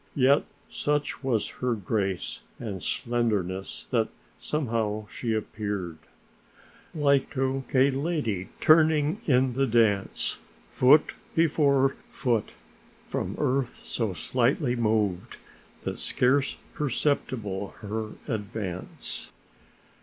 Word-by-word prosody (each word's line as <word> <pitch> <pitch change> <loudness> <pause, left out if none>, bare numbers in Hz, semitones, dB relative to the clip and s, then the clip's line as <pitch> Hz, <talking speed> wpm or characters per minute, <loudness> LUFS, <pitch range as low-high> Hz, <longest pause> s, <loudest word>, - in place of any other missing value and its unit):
Yet 140 +1 +4 0.2
such 145 -1 -1
was 120 -5 +1
her 125 -2 +1
grace 100 -2 -2 0.2
and 100 -6 -5
slenderness 105 -6 -1
that - - +2 0.3
somehow 115 -7 -1
she 115 +2 -4
appeared: 100 -6 -3 1.0
Like 140 -3 +3
to 135 0 0
a 135 +1 +5
lady 135 - -1
turning 155 +2 +4
in 130 -2 +3
the 135 +2 +1
dance, 110 -4 +1 0.3
Foot 140 +4 +5 0.2
before 140 -4 +3
foot 115 -5 -1 0.5
from - - -3
earth 130 -1 0
so 110 -5 -2
slightly 125 - +1
moved, 105 -6 0 0.5
That - - -4
scarce 135 +2 +3 0.2
perceptible 120 -8 -1
her 110 +1 -4
advance. 105 -6 -4
120 Hz, 95 wpm, -27 LUFS, 105-140 Hz, 1.0 s, a